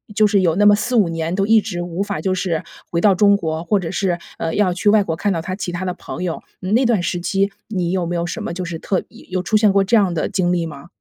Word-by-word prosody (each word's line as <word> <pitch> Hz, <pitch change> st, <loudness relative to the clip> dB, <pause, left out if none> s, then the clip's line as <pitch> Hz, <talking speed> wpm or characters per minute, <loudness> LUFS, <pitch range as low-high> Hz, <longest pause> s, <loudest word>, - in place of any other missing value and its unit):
就 215 Hz, 0 st, +5 dB
是 200 Hz, -2 st, +3 dB
有 170 Hz, -2 st, +2 dB
那 205 Hz, -, +3 dB
么 205 Hz, -, +7 dB
4-5 215 Hz, -3 st, +1 dB
年 165 Hz, 0 st, -2 dB
都 195 Hz, +1 st, +1 dB
一 225 Hz, 0 st, +6 dB
直 195 Hz, -5 st, -4 dB
无 175 Hz, +2 st, -3 dB
法 205 Hz, -1 st, -4 dB
就 190 Hz, -1 st, 0 dB
是 180 Hz, -3 st, -1 dB, 0.3 s
回 170 Hz, -, 0 dB
到 200 Hz, -1 st, +5 dB
中 200 Hz, +1 st, +5 dB
国， 160 Hz, -3 st, -3 dB
或 195 Hz, +4 st, +1 dB
者 170 Hz, -, -4 dB
是， 185 Hz, -3 st, -1 dB, 0.2 s
呃， 165 Hz, 0 st, -2 dB
要 205 Hz, -3 st, +2 dB
去 195 Hz, +3 st, +1 dB
外 210 Hz, -1 st, +5 dB
国 165 Hz, -4 st, -2 dB
看 200 Hz, +4 st, 0 dB
到 165 Hz, -, -2 dB
他 185 Hz, +2 st, -4 dB
其 190 Hz, -3 st, -4 dB
他 175 Hz, +1 st, -4 dB
的 185 Hz, -, -1 dB
朋 -, -, -8 dB
友。 170 Hz, -3 st, -3 dB, 0.2 s
嗯 185 Hz, +3 st, -2 dB
那 255 Hz, +2 st, +3 dB
段 230 Hz, -6 st, +2 dB
时 175 Hz, 0 st, -2 dB
期 195 Hz, +2 st, 0 dB, 0.2 s
你 185 Hz, -5 st, -2 dB
有 185 Hz, -2 st, 0 dB
没 175 Hz, -, -3 dB
有 170 Hz, 0 st, -1 dB
什 -, -, -5 dB
么 -, -, -4 dB
就 185 Hz, -, -4 dB
是 170 Hz, -2 st, -5 dB
特 190 Hz, -, -1 dB
意 -, -, -16 dB
有 185 Hz, 0 st, -1 dB
出 215 Hz, +3 st, +2 dB
现 210 Hz, -2 st, +4 dB
过 195 Hz, -, +4 dB
这 225 Hz, +4 st, +3 dB
样 195 Hz, -4 st, +2 dB
的 160 Hz, -, -1 dB
经 180 Hz, -2 st, +1 dB
历 170 Hz, -1 st, 0 dB
吗？ 145 Hz, +1 st, -10 dB
185 Hz, 315 characters per minute, -20 LUFS, 175-205 Hz, 0.3 s, 么